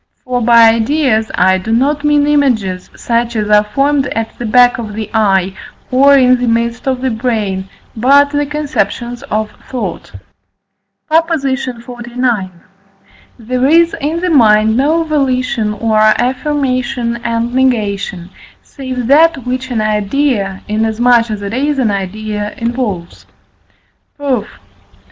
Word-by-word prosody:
For 250 -2 -2
by 230 -1 +6
ideas 225 -1 +1
I 185 +1 +3
do 215 +4 -5
not 280 +5 +1
mean 295 -1 +3
images 240 -11 0
such 235 0 -1
as 210 -1 -1
are 210 0 +5
formed 275 +5 0
at 225 -2 -4
the 240 - -3
back 245 +2 +4
of 215 -3 -6
the 220 -1 -5
eye, 195 -4 +1 0.4
or 275 +2 +5
in 255 -1 +4
the 245 - -1
midst 235 +2 -1
of 260 -1 -1
the 260 -1 -1
brain, 215 -5 -2 0.3
but 280 +5 +4
the 290 0 -1
conceptions 245 -5 -3
of 215 0 -2 0.2
thought. 255 -2 -5 1.0
PROP. 330 +1 +2
XLIX. 245 - -3 0.9
There 250 +2 -1
is 335 +3 +3
in 315 +4 -2
the 365 -1 0
mind 220 -5 +4
no 305 +6 +2
volition 255 -8 -1
or 215 +1 0
affirmation 255 +1 0
and 235 +1 -2
negation, 200 -8 -1 0.3
save 260 -3 -6
that 290 0 +3
which 255 +1 -3
an 235 -3 -1
idea, 210 -1 -1
inasmuch 225 +2 +2
as 210 -1 -5
it 200 +2 -5
is 285 +3 -1
an 240 -5 +1
idea, 210 +2 -4
involves. 230 -7 -4 0.9
Proof. 265 -7 -2
240 Hz, 135 wpm, -14 LUFS, 215-270 Hz, 1.0 s, by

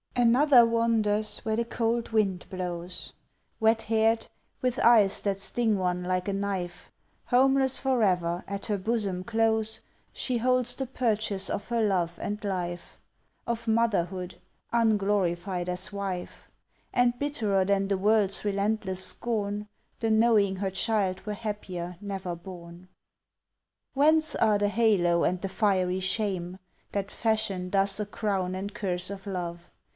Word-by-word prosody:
Another 245 +1 +6
wanders 225 -2 +1
where 220 -1 -2
the 235 - +1
cold 235 0 -1
wind 200 -5 0
blows, 180 -1 -6 0.5
Wet 225 0 +3
haired, 225 +1 +1 0.3
with 250 -1 -1
eyes 220 -5 +5
that 195 -1 -1
sting 220 +1 0
one 180 -1 -1
like 180 +1 -1
a 200 - 0
knife. 190 -3 -4 0.3
Homeless 265 +1 +4
forever, 185 -10 +1
at 200 0 -4
her 210 -2 -1
bosom 200 -3 -1
close 220 0 +1 0.3
She 250 -3 -2
holds 250 0 +2
the 265 - -3
purchase 215 -6 0
of 205 - -3
her 235 -1 +1
love 180 -5 0
and 210 +1 -4
life, 175 -3 -4 0.5
Of 235 0 -3
motherhood, 195 -5 0 0.4
unglorified 195 -5 +1
as 185 +3 -2
wife; 195 -3 -5 0.4
And 245 -1 +2
bitterer 220 -10 0
than 195 0 +1
the 195 -1 0
world's 205 0 +2
relentless 200 -2 0
scorn 210 -3 -2 0.3
The 225 -1 0
knowing 220 -3 +3
her 195 0 -2
child 190 -1 0
were 210 - -1
happier 185 -5 -5
never 195 -3 -4
born. 175 0 -11 1.0
Whence 310 +3 +3
are 215 -2 +3
the 205 0 +1
halo 200 -6 +3
and 180 - +1
the 195 - -2
fiery 185 -3 +1
shame 185 -2 -1 0.3
That 200 0 -3
fashion 215 -5 0
thus 195 +1 +1
a 210 - -1
crown 195 -3 -2
and 200 +2 -5
curse 180 -4 -2
of 200 0 -7
love? 175 -2 -5
205 Hz, 140 wpm, -27 LUFS, 185-225 Hz, 1.0 s, Another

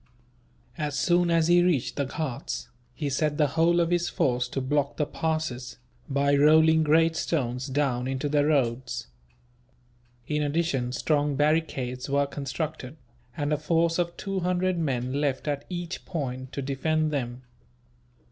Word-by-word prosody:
As 150 -2 -2
soon 175 -1 +3
as 165 -1 +3
he 175 0 +5
reached 175 -8 +1
the 140 - 0
Ghauts, 135 -4 -4 0.3
he 150 - -3
set 145 +2 0
the 150 -2 +3
whole 165 +3 +3
of 170 0 +1
his 175 0 +1
force 125 -1 0
to 130 - -3
block 140 +2 0
the 150 - +1
passes, 155 -6 -3 0.3
by 140 +1 +2
rolling 160 +2 +5
great 165 +2 +3
stones 130 -6 -1
down 130 -3 0
into 135 +2 -2
the 145 0 +2
roads. 125 - 0 1.2
In 150 +3 -1
addition, 145 -4 0
strong 145 +1 +1
barricades 140 -4 0
were 140 +1 +2
constructed, 140 0 -5 0.4
and 145 0 0
a - - +2
force 165 +2 +1
of 170 -1 -1
two 195 -1 -3
hundred 180 0 0
men 130 -5 -1
left, 140 -1 -1
at 145 -1 -2
each 175 -1 -5
point, 130 -6 -4
to 140 - -3
defend 155 +3 0
them. 125 -3 -3
150 Hz, 150 wpm, -27 LUFS, 135-165 Hz, 1.2 s, he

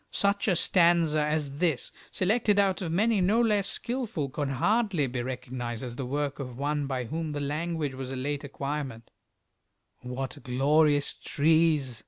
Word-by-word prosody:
Such 200 +1 +1
a 190 - +3
stanza 170 -3 +3
as 150 -2 -2
this, 165 -7 0 0.2
selected 210 +2 +1
out 195 -2 +2
of 170 -3 -3
many 210 +3 +2
no 205 +6 +3
less 210 -4 +2
skilful, 230 - -2
could 145 0 -2
hardly 195 - +1
be 125 -1 -3
recognized 125 -1 -5
as 120 -2 -5
the 130 -1 -4
work 145 +1 -2
of 125 -3 -6
one 145 +1 -1
by 130 -2 -2
whom 155 +5 -4
the 145 - -3
language 150 0 -2
was 130 0 -6
a 135 - -4
late 140 +3 -3
acquirement: 140 -4 -5 0.9
What 130 +3 -5
glorious 145 +3 +2
trees! 150 -5 +1
145 Hz, 160 wpm, -28 LUFS, 135-175 Hz, 0.9 s, a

